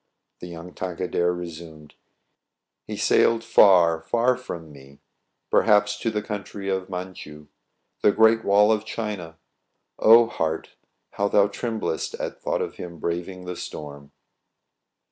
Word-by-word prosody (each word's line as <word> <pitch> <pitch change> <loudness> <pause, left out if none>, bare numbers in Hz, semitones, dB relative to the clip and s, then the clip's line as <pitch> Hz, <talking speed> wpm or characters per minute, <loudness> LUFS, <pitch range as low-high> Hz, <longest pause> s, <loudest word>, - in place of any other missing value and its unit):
The 90 - -8
young 85 +1 -10
Tankadere 90 -1 -1
resumed: 80 -3 -9 0.3
— - - -54
" - - -59
He - - -5
sailed 115 0 +3
far, 90 -7 +5
far 120 +7 +1
from 85 -11 -8
me, 70 0 -16 0.5
Perhaps 105 -1 +3
to 115 - -1
The 105 -1 -3
country 100 -1 -6
of 95 -1 -2
Mantchoux, 90 -5 -8 0.5
The 105 - +5
great 110 +2 +4
wall 105 +2 +4
of 110 -1 +1
China. 105 -8 -5 0.6
O 115 +2 +7
heart! 80 -8 -3 0.4
how 100 - -1
thou 100 0 +4
tremblest 110 - -3
At - - -6
thought - - -1
of - - -7
him 85 -1 -8
braving 90 +3 -4
The 90 0 -5
storm 70 -3 -9
90 Hz, 140 wpm, -24 LUFS, 85-105 Hz, 0.6 s, O